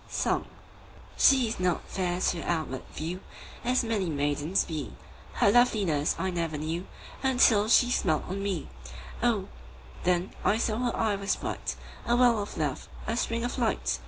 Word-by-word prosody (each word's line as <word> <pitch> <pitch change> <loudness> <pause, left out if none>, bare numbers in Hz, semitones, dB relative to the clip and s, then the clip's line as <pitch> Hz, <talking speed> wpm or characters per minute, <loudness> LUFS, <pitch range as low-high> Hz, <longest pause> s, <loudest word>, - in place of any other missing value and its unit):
Song - - 0 0.7
SHE 265 -3 +5
is 220 - -4
not 180 -2 0
fair 180 -2 -2
to 175 -2 0
outward 155 -7 -2
view 170 +4 -4 0.4
As 250 +1 +2
many 215 -6 -1
maidens 145 +4 0
be, 155 -4 -5 0.4
Her 200 - +4
loveliness 200 -11 +3
I 190 - -1
never 165 -3 -2
knew 165 +5 -3 0.3
Until 245 -5 +4
she 245 +1 +5
smiled 160 -10 +1
on 195 +2 -3
me; 195 -5 -2 0.5
O, - - +2 0.6
then 180 +1 +1
I 215 - +3
saw 225 -1 0
her 245 -1 -1
eye 215 -2 +1
was 200 0 0
bright, - - -4 0.3
5 235 - +3
A - - +5
well 240 -3 +4
of 205 - -7
love, - - -2 0.2
a - - -1
spring 230 -1 -1
of 245 +2 -3
light! 230 -3 0
195 Hz, 165 wpm, -28 LUFS, 170-230 Hz, 0.7 s, SHE